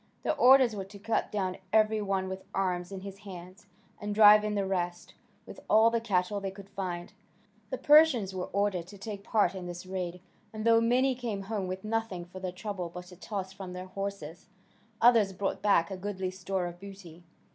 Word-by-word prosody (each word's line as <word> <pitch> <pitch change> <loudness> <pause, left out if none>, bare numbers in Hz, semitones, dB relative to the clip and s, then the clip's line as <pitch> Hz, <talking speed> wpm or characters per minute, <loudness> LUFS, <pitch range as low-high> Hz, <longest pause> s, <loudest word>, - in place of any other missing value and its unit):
Their - - 0
orders 260 -4 +6
were 195 -2 -4
to 200 +1 -12
cut 220 +3 -1
down 190 -3 -2
every 215 0 +3
one 195 -2 -1
with 190 0 -6
arms 180 -1 -1
in 195 -1 -6
his 195 0 -9
hands, 185 -1 -11 0.3
and 205 0 -4
drive 210 0 +8
in 210 0 -1
the 200 -1 0
rest, 175 -2 -3 0.3
with - - -11
all 220 +2 +6
the 230 0 0
cattle 200 -2 0
they 195 -1 -3
could 195 0 -12
find. 175 -3 -5 0.6
The 260 - -3
Persians 290 -11 +5
were 185 -1 -4
ordered 200 -4 -1
to 200 - -12
take 200 0 -7
part 205 -5 +2
in 185 -2 -6
this 175 +1 -7
raid, 180 -1 -4 0.3
and 215 0 -6
though 230 0 +5
many 255 +3 +3
came 230 -6 -4
home 200 -2 -3
with 185 +1 -5
nothing 215 -5 -2
for 185 +2 -10
their 185 -1 -4
trouble 185 -1 -5
but 180 +1 -10
a - - -11
toss 190 0 -5
from 190 -2 -8
their 180 0 -6
horses, 185 -4 -6 0.5
others 225 -5 +5
brought 195 +1 -3
back 195 -4 +3
a 190 - -4
goodly 190 -1 -4
store 190 0 -3
of 175 0 -7
booty. 190 -4 -11
195 Hz, 200 wpm, -29 LUFS, 185-215 Hz, 0.6 s, drive